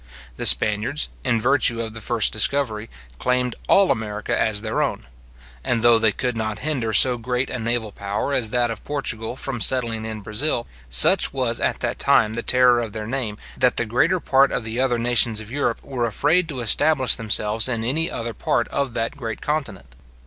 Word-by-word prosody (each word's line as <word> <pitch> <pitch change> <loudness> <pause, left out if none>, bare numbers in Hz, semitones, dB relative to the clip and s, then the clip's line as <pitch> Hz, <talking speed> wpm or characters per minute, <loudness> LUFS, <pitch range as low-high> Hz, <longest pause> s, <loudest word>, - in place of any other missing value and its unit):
The - - 0
Spaniards, 110 +8 +3
in 120 -4 0
virtue 125 -1 +1
of 110 -1 -5
the 115 - -9
first 115 -2 0
discovery, 110 -1 0 0.3
claimed 125 -1 -1
all 195 -1 +4
America 105 -1 -3
as 105 -2 0
their 110 0 -2
own; - - -3 0.6
and 120 -2 -1
though 120 -1 +6
they 110 -1 +4
could 125 +2 -3
not 110 -1 -3
hinder 130 -8 -2
so 125 +3 +5
great 125 +2 -2
a - - -4
naval 115 -1 -2
power 100 +8 -4
as 115 -5 0
that 120 -1 0
of 110 - -8
Portugal 125 -6 -4
from 130 -3 -5
settling 115 -3 +1
in 110 -1 -6
Brazil, 115 +5 -1 0.2
such - - +3
was - - -1
at - - -2
that - - -3
time 110 - +2
the 115 - -3
terror 125 0 +3
of 115 -3 -5
their 110 -1 -6
name, 115 -3 -3 0.2
that 125 - +1
the 120 - +3
greater 155 +12 +1
part 135 -3 +2
of 125 - -3
the 110 +2 -4
other 130 -2 +1
nations 120 -2 +2
of 110 +1 -10
Europe 140 -4 -2
were 125 -4 -3
afraid 160 - +1
to 135 -4 -5
establish 130 +3 +2
themselves 110 +1 +3
in 115 -3 -2
any 155 +8 +1
other 115 0 -5
part 115 +2 -1
of 140 -4 -3
that 115 +5 -2
great 115 -6 -6
continent. 110 - -4
115 Hz, 195 wpm, -21 LUFS, 110-130 Hz, 0.6 s, though